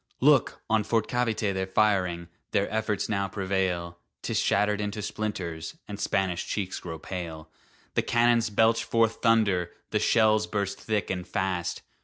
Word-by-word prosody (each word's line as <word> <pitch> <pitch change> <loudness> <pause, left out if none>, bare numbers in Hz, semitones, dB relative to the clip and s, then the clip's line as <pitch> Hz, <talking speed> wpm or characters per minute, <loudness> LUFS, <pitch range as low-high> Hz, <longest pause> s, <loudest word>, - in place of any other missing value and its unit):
Look! - - +3
on 110 -1 +2
Fort 110 0 +1
Cavite 115 -4 0
they're 95 0 -2
firing! 95 -4 +1 0.3
Their 100 - +2
efforts 110 -2 0
now 100 -2 0
prevail; 95 -3 -2 0.2
'Tis - - 0
shattered 105 +1 +2
into 105 0 -3
splinters, 95 -7 -4
And 105 -1 -7
Spanish 95 -4 0
cheeks 95 -3 -2
grow 80 -2 -6
pale 80 -2 -6 0.4
The - - +2
cannons 120 -1 +3
belch 115 +2 +3
forth 115 -1 +1
thunder! 105 -7 +3 0.2
The - - +2
shells 110 -2 +3
burst 100 -2 -2
thick 105 -3 -1
and 90 -1 -4
fast! 95 -3 -2
100 Hz, 150 wpm, -27 LUFS, 90-110 Hz, 0.4 s, Look